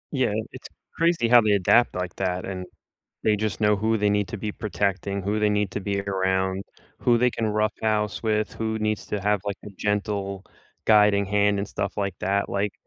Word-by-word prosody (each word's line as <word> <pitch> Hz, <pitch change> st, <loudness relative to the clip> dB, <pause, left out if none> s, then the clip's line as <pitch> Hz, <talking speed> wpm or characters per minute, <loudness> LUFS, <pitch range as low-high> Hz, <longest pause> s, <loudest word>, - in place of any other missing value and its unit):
Yeah, 130 Hz, -6 st, +1 dB, 0.2 s
it's -, -, -10 dB, 0.3 s
crazy 165 Hz, -7 st, +2 dB
how 120 Hz, 0 st, +7 dB
they 105 Hz, -1 st, +2 dB
adapt 100 Hz, +5 st, +3 dB
like 90 Hz, -1 st, -4 dB
that 90 Hz, -1 st, -1 dB
and 95 Hz, -1 st, -5 dB, 0.6 s
they 110 Hz, -, +3 dB
just 105 Hz, -1 st, -3 dB
know 105 Hz, 0 st, +4 dB
who 110 Hz, +3 st, +1 dB
they 105 Hz, -1 st, +2 dB
need 105 Hz, -1 st, +1 dB
to 115 Hz, -, -5 dB
be 105 Hz, +1 st, -3 dB
protecting, 100 Hz, -1 st, -2 dB
who 105 Hz, +3 st, -1 dB
they 105 Hz, 0 st, +3 dB
need 105 Hz, -1 st, +1 dB
to -, -, -3 dB
be 100 Hz, 0 st, -2 dB
around, 95 Hz, 0 st, 0 dB, 0.3 s
who 120 Hz, -1 st, +3 dB
they 125 Hz, +1 st, +4 dB
can 115 Hz, -2 st, -3 dB
roughhouse 105 Hz, -1 st, 0 dB
with, 110 Hz, -1 st, 0 dB
who 110 Hz, 0 st, -2 dB
needs 110 Hz, -1 st, -1 dB
to 105 Hz, -, -3 dB
have 105 Hz, +1 st, +2 dB
like 100 Hz, -1 st, -3 dB
a -, -, -8 dB
gentle 100 Hz, -2 st, -2 dB, 0.4 s
guiding 105 Hz, -2 st, +5 dB
hand 100 Hz, 0 st, +2 dB
and 100 Hz, -, -3 dB
stuff 100 Hz, -, -3 dB
like 100 Hz, -3 st, -2 dB
that, 100 Hz, +1 st, 0 dB
like, 100 Hz, 0 st, -1 dB
105 Hz, 200 wpm, -25 LUFS, 100-110 Hz, 0.6 s, how